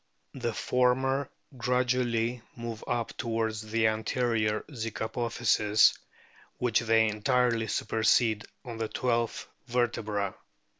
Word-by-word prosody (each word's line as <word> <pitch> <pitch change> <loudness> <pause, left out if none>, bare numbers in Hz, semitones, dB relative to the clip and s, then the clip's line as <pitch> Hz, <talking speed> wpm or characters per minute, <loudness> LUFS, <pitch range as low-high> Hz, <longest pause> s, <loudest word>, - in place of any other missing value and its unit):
The 120 -3 -2
former 130 +2 +1 0.3
gradually 125 -1 0
move 115 -2 -6
up 120 -1 -2
towards 115 -1 -1
the 110 +1 0
anterior 110 0 +1
zygapophyses, 110 -2 +2 0.6
which 120 -3 +2
they 115 -1 +3
entirely 115 +1 +1
supersede 110 0 +2 0.2
on 120 -2 -6
the 110 - -1
twelfth 120 -1 -1 0.2
vertebra. 110 -5 -1
115 Hz, 95 wpm, -29 LUFS, 110-125 Hz, 0.6 s, they